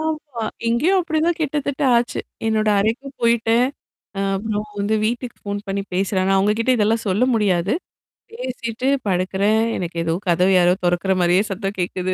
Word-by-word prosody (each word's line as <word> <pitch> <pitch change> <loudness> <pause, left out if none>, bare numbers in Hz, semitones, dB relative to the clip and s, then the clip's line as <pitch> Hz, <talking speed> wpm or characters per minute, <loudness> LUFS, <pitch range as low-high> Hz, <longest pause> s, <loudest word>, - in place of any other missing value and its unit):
ஆமா. 305 -6 -4 0.3
இங்கேயும் 315 +12 +3
அப்பிடி 320 -3 -1
தான் 345 -1 +1
கிட்டத்தட்ட 290 -1 -2
ஆச்சு. 240 +1 0 0.3
என்னோட 215 -1 +1
அறைக்கும் 260 +6 -2
போயிட்டேன். 235 +1 +3 0.5
அ - - 0 0.2
அப்புறம் 210 +1 -2 0.2
வந்து 205 +2 +1
வீட்டுக்கு 240 +1 -3
ஃபோன் 205 0 -3
பண்ணி 195 0 -1
பேசுறாங்க. 190 0 +1
அவங்ககிட்ட 210 +5 +2
இதெல்லாம் 225 +2 +1
சொல்ல 205 +7 +2
முடியாது. 195 -3 +1 0.6
பேசிட்டு 250 - -4 0.2
படுக்கிறேன், 195 +4 +1 0.2
எனக்கு 175 -2 -5
ஏதோ 165 0 0
கதவு 180 +2 +3
யாரோ 175 0 +5
தொறக்கிற 175 +2 +1
மாதிரியே 180 +2 +4
சத்தம் 195 +1 -3
கேட்குது. 185 +1 -1
215 Hz, 150 wpm, -21 LUFS, 190-245 Hz, 0.6 s, யாரோ